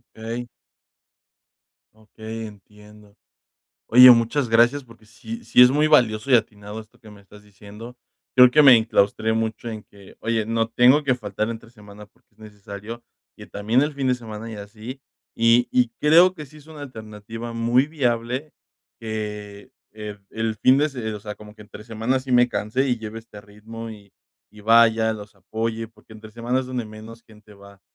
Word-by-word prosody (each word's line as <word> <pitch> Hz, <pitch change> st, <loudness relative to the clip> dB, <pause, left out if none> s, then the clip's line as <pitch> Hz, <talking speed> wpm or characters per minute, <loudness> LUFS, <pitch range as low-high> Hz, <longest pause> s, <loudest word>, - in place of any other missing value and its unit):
Ey. 115 Hz, +2 st, -6 dB, 1.5 s
Okey, 110 Hz, +1 st, -9 dB
entiendo. 105 Hz, 0 st, -17 dB, 0.7 s
Oye, 125 Hz, +2 st, +9 dB
muchas 120 Hz, +2 st, +3 dB
gracias 120 Hz, +5 st, +3 dB
porque 115 Hz, -2 st, -19 dB
sí 230 Hz, -, -10 dB
sí 125 Hz, -, +5 dB
es 125 Hz, -, +8 dB
muy 150 Hz, +3 st, +2 dB
valioso 125 Hz, -3 st, +2 dB
y -, -, +8 dB
atinado 105 Hz, -1 st, -3 dB
esto 110 Hz, -1 st, -16 dB
que 110 Hz, -3 st, -15 dB
me 100 Hz, -1 st, -16 dB
estás 105 Hz, +1 st, -18 dB
diciendo, 105 Hz, +4 st, -13 dB, 0.4 s
creo 125 Hz, -1 st, +8 dB
que 150 Hz, +4 st, +4 dB
me 135 Hz, -3 st, +9 dB
enclaustré 110 Hz, -1 st, +1 dB
mucho 115 Hz, +1 st, -3 dB
en 110 Hz, -2 st, -7 dB
que: 100 Hz, -1 st, -18 dB
"Oye, 110 Hz, -1 st, -1 dB
no 115 Hz, 0 st, 0 dB
tengo 125 Hz, +6 st, +4 dB
que 135 Hz, -2 st, +2 dB
faltar 110 Hz, -2 st, -4 dB
entre 115 Hz, 0 st, -10 dB
semana 105 Hz, -2 st, -15 dB
porque -, -, -37 dB
es -, -, -34 dB
necesario 105 Hz, +2 st, -10 dB, 0.3 s
que -, -, -11 dB
también 110 Hz, +6 st, 0 dB
el 150 Hz, 0 st, -3 dB
fin 135 Hz, -2 st, -3 dB
de 125 Hz, -, +2 dB
semana", 115 Hz, -2 st, -9 dB
y 110 Hz, -, -7 dB
así 110 Hz, +6 st, -10 dB, 0.3 s
y 115 Hz, +1 st, +3 dB
y 125 Hz, -2 st, +2 dB
creo 170 Hz, +5 st, +5 dB
que 150 Hz, -5 st, -10 dB
sí 155 Hz, -, -17 dB
es 150 Hz, -, -17 dB
una 155 Hz, -2 st, -12 dB
alternativa 115 Hz, -2 st, -9 dB
muy 120 Hz, +3 st, +2 dB
viable 130 Hz, -1 st, -2 dB, 0.5 s
que, 105 Hz, -2 st, -7 dB, 0.2 s
eh, 105 Hz, -1 st, -8 dB
el 110 Hz, 0 st, -3 dB
fin 130 Hz, +6 st, +3 dB
de 150 Hz, -, +1 dB
se 120 Hz, -6 st, -5 dB
o 105 Hz, -, -7 dB
sea, 105 Hz, 0 st, -8 dB
como 105 Hz, 0 st, -14 dB
que 110 Hz, -, -16 dB
entre 105 Hz, 0 st, -12 dB
semana 115 Hz, +4 st, -2 dB
sí 130 Hz, 0 st, -8 dB
me 125 Hz, 0 st, +5 dB
canse 125 Hz, +6 st, -1 dB
y 120 Hz, -, 0 dB
lleve 110 Hz, 0 st, -8 dB
este 110 Hz, -2 st, -14 dB
ritmo 110 Hz, +2 st, -10 dB
y 100 Hz, -2 st, -15 dB, 0.4 s
y 105 Hz, 0 st, -15 dB
vaya, 110 Hz, 0 st, +4 dB
los 105 Hz, -1 st, -11 dB
apoye, 110 Hz, +3 st, -4 dB
porque 110 Hz, 0 st, -19 dB
entre 110 Hz, 0 st, -13 dB
semana 120 Hz, +3 st, -2 dB
es -, -, -8 dB
donde 125 Hz, -3 st, -4 dB
menos 110 Hz, +2 st, -12 dB
gente 105 Hz, -1 st, -19 dB
va, 100 Hz, -1 st, -17 dB
115 Hz, 185 wpm, -22 LUFS, 105-125 Hz, 1.5 s, Oye